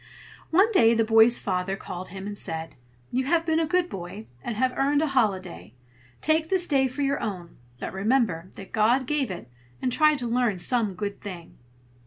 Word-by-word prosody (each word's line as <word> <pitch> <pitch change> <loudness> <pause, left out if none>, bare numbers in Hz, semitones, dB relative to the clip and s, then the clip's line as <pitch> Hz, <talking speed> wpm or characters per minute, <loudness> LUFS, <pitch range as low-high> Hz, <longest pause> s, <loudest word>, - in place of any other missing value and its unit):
One 390 +7 +4
day 230 - +5
the 225 - +3
boy's 225 +2 +6
father 185 0 -2
called 185 -1 -7
him 190 +2 -8
and 205 0 -5
said: 160 -4 -4 0.4
"You 260 +1 0
have 330 +3 +2
been 320 -1 +2
a 325 - 0
good 360 +1 +1
boy, 195 - -7 0.2
and 230 - -4
have 255 +1 +1
earned 285 +2 +2
a 310 - 0
holiday. 190 - -1 0.5
Take 315 +1 +1
this 375 -2 +1
day 270 -5 +2
for 270 +3 -4
your 280 +1 0
own; 185 -6 -5 0.2
but - - -5
remember 195 -4 0
that 195 - -11
God 235 +5 +2
gave 280 -2 0
it, 175 -9 -7 0.3
and 250 - -1
try 305 +3 +4
to 250 -4 -2
learn 235 -4 +1
some 210 +1 +1
good 200 +1 -5
thing." 180 -5 -9
230 Hz, 195 wpm, -26 LUFS, 190-280 Hz, 0.5 s, boy's